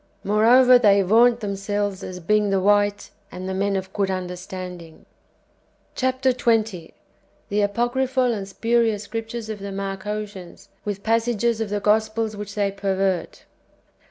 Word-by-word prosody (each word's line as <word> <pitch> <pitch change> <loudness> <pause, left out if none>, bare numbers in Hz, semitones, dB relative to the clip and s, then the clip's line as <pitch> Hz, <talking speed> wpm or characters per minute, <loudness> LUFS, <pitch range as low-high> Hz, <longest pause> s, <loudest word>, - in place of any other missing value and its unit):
^ - - -40 0.2
Moreover, 245 +5 +6
they 200 -3 +5
vaunt 235 +5 +4
themselves 205 -1 -2
as 180 -1 -7
being 210 +4 +1
the 195 -1 +2
white 205 +1 +1 0.2
and 185 +1 -7
the 190 - -3
men 200 +1 0
of 190 0 -4
good 200 -2 0
under 185 -1 -3
standing. 180 -3 -9 0.9
CllAP. 260 0 -1
XX. 225 -8 +1 0.3
— 200 - -38
The 205 - 0
apocryplial 245 +4 +1
and 200 -3 -5
spurious 225 +1 0
Scriptures 225 +1 -5
of 215 -1 -5
the 200 0 -6
Marcosians, 195 -1 -6 0.2
ivith 200 -1 -3
p)assages 230 +1 0
of 220 - -2
the 205 0 -1
Gospels 215 +1 +1
ivhiclt 205 -1 -7
they 200 -1 0
pervert. 195 -2 -2
205 Hz, 150 wpm, -23 LUFS, 195-225 Hz, 0.9 s, Moreover